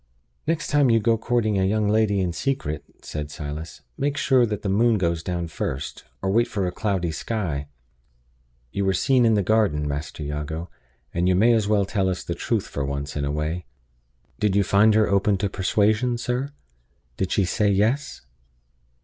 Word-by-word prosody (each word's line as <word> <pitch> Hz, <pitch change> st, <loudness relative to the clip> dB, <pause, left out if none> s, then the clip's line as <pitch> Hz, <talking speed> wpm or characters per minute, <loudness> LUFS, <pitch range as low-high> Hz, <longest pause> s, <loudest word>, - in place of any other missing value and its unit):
"Next 165 Hz, -1 st, 0 dB
time 145 Hz, -3 st, +4 dB
you 115 Hz, -1 st, +5 dB
go 115 Hz, +1 st, +3 dB
courting 110 Hz, -2 st, 0 dB
a -, -, +2 dB
young 105 Hz, +2 st, +1 dB
lady 105 Hz, -2 st, +2 dB
in 90 Hz, -2 st, -1 dB
secret," 80 Hz, -, -2 dB, 0.2 s
said 75 Hz, -1 st, -5 dB
Silas, 75 Hz, +2 st, -7 dB, 0.2 s
"make 140 Hz, +1 st, 0 dB
sure 130 Hz, -3 st, +3 dB
that 105 Hz, -1 st, -4 dB
the -, -, -2 dB
moon 110 Hz, +3 st, +3 dB
goes 85 Hz, -3 st, 0 dB
down 85 Hz, 0 st, -3 dB
first, 65 Hz, -4 st, -5 dB, 0.2 s
or 95 Hz, -, +1 dB
wait 120 Hz, +4 st, +3 dB
for 100 Hz, -5 st, -2 dB
a 90 Hz, -, -1 dB
cloudy 90 Hz, -3 st, -1 dB
sky. 80 Hz, -7 st, -3 dB, 1.0 s
You 100 Hz, -, -1 dB
were 95 Hz, 0 st, +2 dB
seen 125 Hz, +5 st, +3 dB
in 110 Hz, -, +4 dB
the 100 Hz, -, +2 dB
garden, 95 Hz, -8 st, +2 dB
Master 75 Hz, +2 st, -4 dB
Jago; 75 Hz, +3 st, -4 dB, 0.4 s
and 85 Hz, +1 st, +1 dB
you 90 Hz, -, +3 dB
may 115 Hz, +6 st, +5 dB
as 110 Hz, -3 st, +2 dB
well 105 Hz, -2 st, +3 dB
tell 95 Hz, -1 st, 0 dB
us 90 Hz, -, -3 dB
the -, -, -3 dB
truth -, -, -1 dB
for 70 Hz, -, -4 dB
once 70 Hz, +1 st, -4 dB
in 75 Hz, -, -1 dB
a 70 Hz, -, -1 dB
way. 75 Hz, +3 st, -3 dB, 0.7 s
Did 105 Hz, -2 st, +1 dB
you 100 Hz, -, +4 dB
find 105 Hz, +3 st, +4 dB
her 110 Hz, -1 st, +4 dB
open 100 Hz, 0 st, +2 dB
to 100 Hz, +1 st, -1 dB
persuasion, 110 Hz, +5 st, +1 dB
sir? 125 Hz, +3 st, -2 dB, 0.7 s
Did 95 Hz, -, -1 dB
she 100 Hz, -, +2 dB
say 105 Hz, +3 st, +1 dB
'Yes? 115 Hz, +9 st, +1 dB
100 Hz, 190 wpm, -24 LUFS, 85-110 Hz, 1.0 s, you